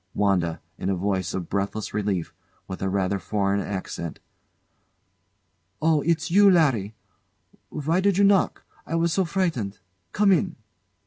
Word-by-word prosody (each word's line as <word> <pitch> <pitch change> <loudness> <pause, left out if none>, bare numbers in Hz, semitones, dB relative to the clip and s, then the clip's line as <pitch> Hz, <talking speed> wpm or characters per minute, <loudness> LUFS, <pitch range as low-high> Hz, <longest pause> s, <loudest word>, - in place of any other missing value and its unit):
] 90 - -47
WANDA. 90 -5 +1 0.2
[In 95 - -2
a 95 - +1
voice 95 0 -1
of 90 -3 -4
breathless 100 +2 -3
relief, 100 -5 -2 0.3
with 95 - -7
a 95 - 0
rather 95 0 0
foreign 100 +1 0
accent] 95 -5 -5 1.6
Oh! 160 -2 +3
it's 160 0 0
you, 200 +2 +7
Larry! 130 - +2 0.7
Why 155 +4 0
did 195 -1 +2
you 200 - +4
knock? 195 -1 +3 0.2
I 165 - -2
was 165 0 +1
so 190 - +2
frightened. 165 - -1 0.3
Come 205 -1 +3
in! 180 - +2
105 Hz, 145 wpm, -25 LUFS, -, 1.6 s, you